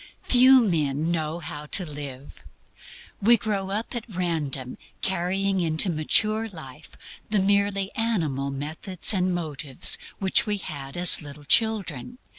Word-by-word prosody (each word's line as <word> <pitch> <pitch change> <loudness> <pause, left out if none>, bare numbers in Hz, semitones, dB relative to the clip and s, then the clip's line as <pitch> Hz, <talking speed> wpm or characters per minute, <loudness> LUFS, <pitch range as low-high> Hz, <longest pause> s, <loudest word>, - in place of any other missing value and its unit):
Few 260 +1 +6
men 160 - 0
know 160 -1 -2
how 150 -2 -8
to 185 +4 -1
live. 145 -3 -9 0.8
We 235 +4 +5
grow 200 -3 -3
up 215 +5 -4
at 240 0 -6
random 155 - -3 0.2
carrying 190 +1 0
into 165 +2 +2
mature 215 +8 +1
life 155 -5 -13 0.3
the 210 - 0
merely 200 0 +1
animal 160 - -1
methods 155 +9 0
and 185 -1 +1
motives 150 -6 0 0.2
which 190 +1 +2
we 210 -1 0
had 140 -5 -8
as 175 -1 +6
little 145 0 -11
children. 220 - +1
175 Hz, 130 wpm, -24 LUFS, 150-205 Hz, 0.8 s, Few